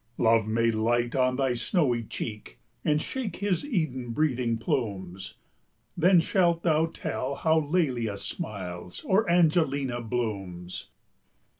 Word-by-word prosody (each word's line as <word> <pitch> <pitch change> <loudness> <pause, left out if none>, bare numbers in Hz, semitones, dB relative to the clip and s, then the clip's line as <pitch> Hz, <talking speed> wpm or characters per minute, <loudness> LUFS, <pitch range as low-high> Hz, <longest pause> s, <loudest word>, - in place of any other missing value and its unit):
Love 115 -1 +3
may 115 +1 +2
light 120 +2 +1
on 130 -1 +2
thy 135 -1 +1
snowy 120 - +1
cheek, 105 - -6 0.3
And 150 0 +2
shake 245 +5 -4
his 200 -3 0
Eden 155 - -2
breathing 125 -5 +1
plumes; 95 -6 -3 0.6
Then 180 +1 +5
shalt 170 -1 +2
thou 160 -1 +3
tell 140 -4 -4
how 160 +2 +3
Lelia 135 - 0
smiles, 90 -3 -5
Or 200 +1 +2
Angelina 155 -7 +2
blooms. 100 -7 -4
125 Hz, 120 wpm, -27 LUFS, 110-160 Hz, 0.6 s, Then